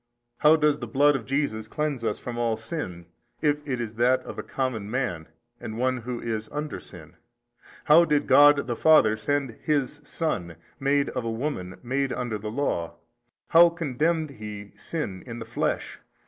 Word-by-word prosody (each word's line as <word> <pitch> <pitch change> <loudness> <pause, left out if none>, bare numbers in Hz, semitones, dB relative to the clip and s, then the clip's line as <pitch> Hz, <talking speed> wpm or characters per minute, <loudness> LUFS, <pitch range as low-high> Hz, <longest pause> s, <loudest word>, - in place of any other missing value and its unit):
how 150 +1 +6
does 150 -2 +2
the 120 - -5
Blood 145 +5 +4
of 125 -5 -4
Jesus 130 -6 -1
cleanse 150 -2 -2
us 110 - -1
from 120 - -6
all 115 -2 0
sin, 110 - -5 0.3
if 150 -1 +2
it 130 -3 -2
is 115 -2 -4
that 125 +3 +3
of - - -8
a - - -1
common 120 -6 -3
man 110 -10 -2 0.3
and 110 - -6
one 130 +1 +1
who 120 0 -5
is 110 -2 -4
under 150 0 -4
sin? 85 -2 -14 0.7
how 160 +3 +7
did 150 -3 +1
God 145 0 +6
the 120 -1 -2
Father 135 -7 +5
send 130 +2 -2
His 145 -1 -1
Son, 90 - -3 0.2
made 140 +1 +2
of 125 - -3
a 115 - -2
woman, 115 -7 -4
made 135 +2 -1
under 120 -4 -3
the 105 +1 -5
law? 110 -9 -2 0.5
how 170 +1 +8
condemned 160 0 -1
He 105 -4 -8
sin 105 - -5
in 115 -1 -6
the 115 - -6
flesh? - - -2
125 Hz, 175 wpm, -26 LUFS, 110-145 Hz, 0.7 s, how